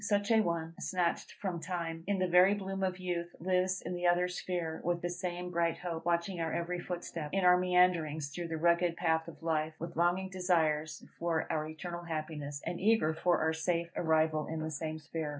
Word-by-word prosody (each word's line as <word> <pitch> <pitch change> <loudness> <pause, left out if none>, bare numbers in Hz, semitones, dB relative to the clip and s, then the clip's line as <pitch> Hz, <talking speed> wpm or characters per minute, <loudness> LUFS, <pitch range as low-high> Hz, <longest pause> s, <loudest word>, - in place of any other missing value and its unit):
Such 205 +1 +1
a 220 -1 +6
one, 165 -3 -2
snatched 180 -2 -1
from 185 -4 -3
time 165 -2 -4
in 200 -1 +1
the 185 0 +1
very 180 +3 +6
bloom 195 -1 -4
of 185 -1 0
youth, 175 -2 -3
lives 185 +1 +1
in - - -4
the 175 0 0
other 175 +1 +4
sphere, 175 -2 -3
with 175 0 0
the 175 - -1
same 180 0 -4
bright 170 -1 +1
hope, 165 -1 -4
watching 170 +1 0
our 165 -1 -1
every 175 +1 -2
footstep, 170 -3 -5
in 195 -1 +2
our 180 0 +8
meanderings 180 -5 +2
through 170 +4 -5
the 165 -1 -3
rugged 170 +1 +3
path 160 -1 +1
of 165 - -11
life, 155 -1 0
with 170 +1 -6
longing 175 +3 +2
desires 160 -5 +1 0.2
for 165 -1 0
our 155 -1 -1
eternal 170 +2 -6
happiness, 155 -3 -4
and 175 - -3
eager 205 -7 +3
for 175 +2 +2
our 160 0 +2
safe 170 +1 -1
arrival 155 -2 +2
in 160 0 -3
the 160 0 -3
same 155 +1 -3
sphere. 155 0 -4
170 Hz, 205 wpm, -32 LUFS, 160-180 Hz, 0.2 s, our